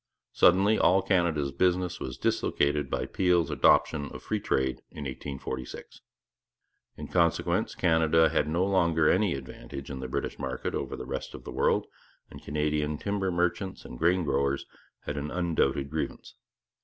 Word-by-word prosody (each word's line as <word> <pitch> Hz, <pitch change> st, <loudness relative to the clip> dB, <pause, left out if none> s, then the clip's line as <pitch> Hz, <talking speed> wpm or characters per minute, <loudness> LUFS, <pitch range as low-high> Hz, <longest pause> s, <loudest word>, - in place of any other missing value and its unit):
Suddenly 100 Hz, +5 st, +4 dB
all 95 Hz, +1 st, +4 dB
Canada's 85 Hz, -7 st, +1 dB
business 90 Hz, +2 st, +1 dB
was 65 Hz, -2 st, -5 dB
dislocated 75 Hz, -1 st, 0 dB
by -, -, -1 dB
Peel's 90 Hz, -4 st, +1 dB
adoption 75 Hz, -1 st, +3 dB
of -, -, -10 dB
free -, -, -1 dB
trade 65 Hz, -1 st, 0 dB
in 75 Hz, -, -8 dB
1846. 65 Hz, -1 st, -6 dB, 1.0 s
In 75 Hz, -, -7 dB
consequence 85 Hz, -1 st, +1 dB
Canada 80 Hz, -2 st, +3 dB
had 75 Hz, -, +1 dB
no 85 Hz, +4 st, +1 dB
longer 85 Hz, -5 st, +2 dB
any 95 Hz, -3 st, +3 dB
advantage 70 Hz, +1 st, -8 dB
in 65 Hz, -, -5 dB
the 65 Hz, -, -5 dB
British 65 Hz, -, -3 dB
market 65 Hz, -2 st, -3 dB
over -, -, -3 dB
the -, -, -7 dB
rest -, -, -5 dB
of -, -, -10 dB
the -, -, -7 dB
world, -, -, +1 dB, 0.5 s
and -, -, -11 dB
Canadian 75 Hz, 0 st, -1 dB
timber 100 Hz, +1 st, -1 dB
merchants 90 Hz, +2 st, -1 dB
and 60 Hz, -, -9 dB
grain 90 Hz, +2 st, +3 dB
growers 70 Hz, -1 st, 0 dB, 0.4 s
had 75 Hz, -, -5 dB
an 70 Hz, +1 st, -3 dB
undoubted 75 Hz, -6 st, 0 dB
grievance. 80 Hz, 0 st, -4 dB
80 Hz, 155 wpm, -28 LUFS, 70-90 Hz, 1.0 s, Suddenly